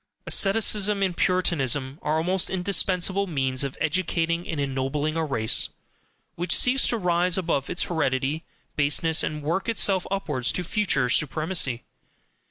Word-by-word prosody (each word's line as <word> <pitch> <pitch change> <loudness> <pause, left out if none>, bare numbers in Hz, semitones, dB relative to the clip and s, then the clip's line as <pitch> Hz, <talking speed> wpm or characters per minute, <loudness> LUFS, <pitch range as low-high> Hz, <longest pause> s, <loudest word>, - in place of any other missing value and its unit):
Asceticism 205 0 +2
and 185 -2 -1
Puritanism 145 -7 0
are 155 +1 -1
almost 180 +3 +1
indispensable 190 +1 +1
means 135 -5 -1
of 140 -1 -5
educating 170 0 -1
and 160 - -4
ennobling 140 +3 -2
a 165 - -1
race 110 -8 +1 0.6
which 175 +2 +1
seeks 260 +2 +4
to 235 - 0
rise 180 -2 +1
above 165 -7 -1
its - - +1
hereditary 150 -1 -1 0.3
baseness 155 +2 +2
and 150 -1 -3
work 180 +8 -2
itself 195 -4 +2
upwards 150 -10 -1
to 180 - -1
future 175 - 0
supremacy. 150 -1 0
165 Hz, 135 wpm, -24 LUFS, 145-185 Hz, 0.6 s, seeks